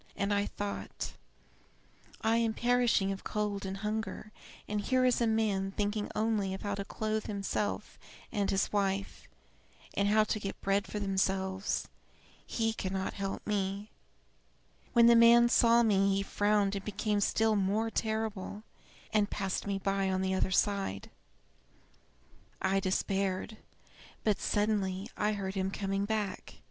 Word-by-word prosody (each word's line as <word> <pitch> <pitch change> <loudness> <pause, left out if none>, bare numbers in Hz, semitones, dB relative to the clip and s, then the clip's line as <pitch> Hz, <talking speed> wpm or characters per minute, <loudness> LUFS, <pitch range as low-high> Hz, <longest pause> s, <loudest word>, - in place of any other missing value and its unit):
And 200 0 0
I 205 0 +1
thought: 205 0 -5 1.1
'I 225 0 +3
am 230 -1 +1
perishing 240 -5 +2
of 195 - -5
cold 205 -2 -2
and 190 +1 -4
hunger, 215 0 -3 0.4
and 210 0 -1
here 255 +4 +2
is 250 -1 +3
a 235 - +3
man 210 -3 +1
thinking 205 +1 -1
only 210 -3 0
of - - -9
how 205 -1 -1
to 200 0 -3
clothe 215 +2 -3
himself 205 0 -3 0.3
and 205 -3 0
his 195 +1 0
wife, 195 -1 -1 0.7
and 200 - +1
how 215 +1 +5
to 215 0 -2
get 195 -1 -5
bread 195 +1 0
for - - -5
themselves. 190 -1 -1 0.6
He 225 -1 0
cannot 190 -2 -3
help 195 -1 -4
me.' 200 0 -2 1.0
When 235 -2 +7
the 235 0 +7
man 235 +1 +7
saw 235 0 +5
me 195 -3 +3
he 195 - 0
frowned 205 0 +1
and 195 - -4
became 210 0 -1
still 220 +2 +2
more 210 +3 +1
terrible, 220 -2 -2 0.5
and 210 -1 +3
passed 195 -1 -2
me 200 -1 0
by 195 0 0
on 190 0 0
the 190 0 0
other 190 - +1
side. 195 - 0 1.5
I 195 +1 +2
despaired; 195 +2 -1 0.7
but 210 -3 +2
suddenly 205 -1 0
I 210 +1 +1
heard 195 -2 -3
him 190 -1 -1
coming 195 0 -2
back. 210 -2 -3
205 Hz, 145 wpm, -31 LUFS, 195-215 Hz, 1.5 s, When